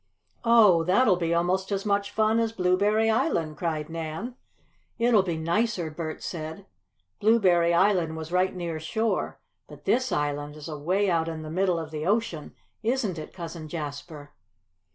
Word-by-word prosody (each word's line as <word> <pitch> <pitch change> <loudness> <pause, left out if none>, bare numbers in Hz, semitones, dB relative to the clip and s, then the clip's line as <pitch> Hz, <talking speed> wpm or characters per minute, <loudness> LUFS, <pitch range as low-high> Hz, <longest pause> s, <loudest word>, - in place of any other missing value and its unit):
"Oh, 215 -8 +6
that'll 190 +4 +4
be 170 -2 -1
almost 180 +3 0
as 195 0 -1
much 200 0 +1
fun 220 +1 +2
as 225 -1 +1
Blueberry 205 +3 +2
Island!" 165 -8 0
cried 155 -3 -2
Nan. 165 +8 -5 0.6
"It'll 230 -3 +4
be 175 -4 -3
nicer!" 170 +1 0
Bert 155 0 -6
said. 160 -2 -6 0.5
"Blueberry 185 -6 +4
Island 170 -3 +2
was 160 +1 -7
right 185 +1 +1
near 170 -3 -4
shore, 220 +8 -2 0.3
but - - -14
this 255 +1 +1
island 145 0 -2
is 150 0 -9
away 170 +7 0
out 165 -3 +1
in 160 -1 -5
the 155 - -7
middle 185 0 +1
of 160 -2 -5
the 155 +1 -4
ocean, 200 -8 -1 0.3
isn't 225 -7 -1
it, 155 - -8
Cousin 165 -3 -7
Jasper?" 150 -1 -7
175 Hz, 155 wpm, -26 LUFS, 160-205 Hz, 0.6 s, Oh